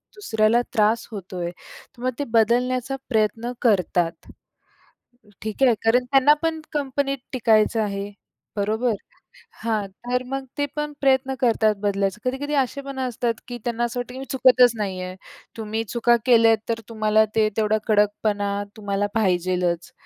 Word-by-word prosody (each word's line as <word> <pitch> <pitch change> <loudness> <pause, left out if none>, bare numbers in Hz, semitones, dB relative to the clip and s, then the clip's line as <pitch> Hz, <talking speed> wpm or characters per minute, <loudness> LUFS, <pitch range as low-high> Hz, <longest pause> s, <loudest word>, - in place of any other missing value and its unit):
दुसऱ्याला 230 - +2
त्रास 220 +2 +2
होतोय, 185 -4 -5
तर 210 +6 -17
मग 255 - +1
ते 285 - 0
बदलण्याचा 250 +3 +1
प्रयत्न 225 +1 0
करतात. 180 -6 +1 1.1
ठीक 215 +4 -3
आहे? 250 -3 +6
कारण 245 +3 +4
त्यांना 270 +2 +5
पण 325 -1 -1
कंपनीत 275 -1 -1 0.2
टिकायचं 225 -2 +3
आहे, 200 -1 -3 0.4
बरोबर? 220 +4 0 0.7
हां, 220 -3 0 0.2
तर 250 +1 0
मग 270 +1 -4
ते 290 - +1
पण 300 0 -3
प्रयत्न 265 -1 +2
करतात 220 -3 +3
बदलायचा. 200 -1 0
कधी-कधी 270 +4 -2
असे 270 +2 -4
पण 275 -1 -7
असतात 245 -2 -1
की 245 -1 -5
त्यांना 240 0 -1
असं 240 +1 -2
वाटतं 245 0 -6
की 260 - -7
मी 270 - -6
चुकतच 255 -1 +5
नाही 195 -3 -3
आहे. 185 0 -6 0.4
तुम्ही 220 0 -3
चुका 235 +2 +2
केल्या 230 -3 +6
तर 230 0 0
तुम्हाला 215 -1 +3
ते 220 -1 +4
तेवढा 215 0 +2
कडकपणा 205 -1 +1 0.2
तुम्हाला 205 -1 -1
पाहिजेच, 180 -4 0
225 Hz, 145 wpm, -23 LUFS, 210-255 Hz, 1.1 s, आहे